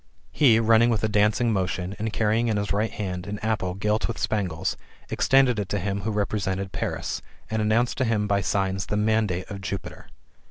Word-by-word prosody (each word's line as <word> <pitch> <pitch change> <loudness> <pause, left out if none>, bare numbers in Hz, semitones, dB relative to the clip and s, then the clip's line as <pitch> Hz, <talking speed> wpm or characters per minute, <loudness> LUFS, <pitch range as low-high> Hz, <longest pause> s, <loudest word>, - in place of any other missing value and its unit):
He, 120 -7 +5
running 115 +1 +5
with 110 -3 0
a - - +3
dancing 105 +3 +2
motion, 90 0 -2
and 110 +1 -2
carrying 110 +2 +1
in 110 -2 +1
his 100 -1 -1
right 105 +2 +1
hand 90 -2 -5
an 105 +1 -4
apple 105 -5 -1
gilt 105 +3 0
with 115 - -4
spangles, 95 -4 -1 0.4
extended 130 -4 +3
it 100 -2 -3
to 100 - 0
him 100 +1 -2
who 110 - -2
represented 100 -2 -2
Paris, - - -3 0.3
and 110 0 0
announced 115 +4 +1
to - - +3
him 110 -3 +1
by 100 -1 +2
signs 95 0 -1
the 105 - -1
mandate 105 -4 +1
of 100 -1 -6
Jupiter. 95 0 -6
105 Hz, 195 wpm, -25 LUFS, 95-110 Hz, 0.4 s, He